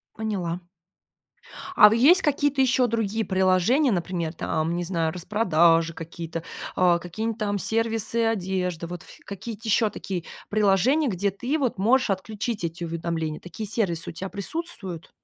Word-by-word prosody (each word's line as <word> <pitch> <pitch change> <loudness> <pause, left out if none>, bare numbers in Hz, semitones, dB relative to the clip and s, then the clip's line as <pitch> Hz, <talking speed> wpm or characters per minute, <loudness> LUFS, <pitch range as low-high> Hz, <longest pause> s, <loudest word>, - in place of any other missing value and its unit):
Поняла. 185 -5 -3 1.1
А 210 +1 +8
есть 310 +11 +6
какие-то 290 -2 +1
еще 255 -1 +3
другие 220 -1 -1
приложения, 190 - +3
например, 175 -3 -2
там, 160 +1 -1
не 175 - -2
знаю, 165 -3 -1
распродажи 170 -3 +2
какие-то, 165 0 -6 0.3
э, 175 -2 +4
какие-нибудь 215 +6 -4
там 205 -2 -1
сервисы 225 +2 0
одежды, 185 -5 -1
вот, 175 -1 -7
ф - - -14
какие-то 220 +3 -7
еще 220 0 +3
такие 180 -5 -5 0.3
приложения, 215 - +3
где 200 -2 0
ты, 250 - -2
вот, 260 -9 -1
можешь 235 +4 +3
отключить 210 +2 -3
эти 170 +1 -4
уведомления, 165 -2 -3
такие 185 +5 -7
сервисы 190 -7 -1
у - - -15
тя 190 +4 -5
присутствуют? 200 - -4
195 Hz, 140 wpm, -25 LUFS, 170-225 Hz, 1.1 s, А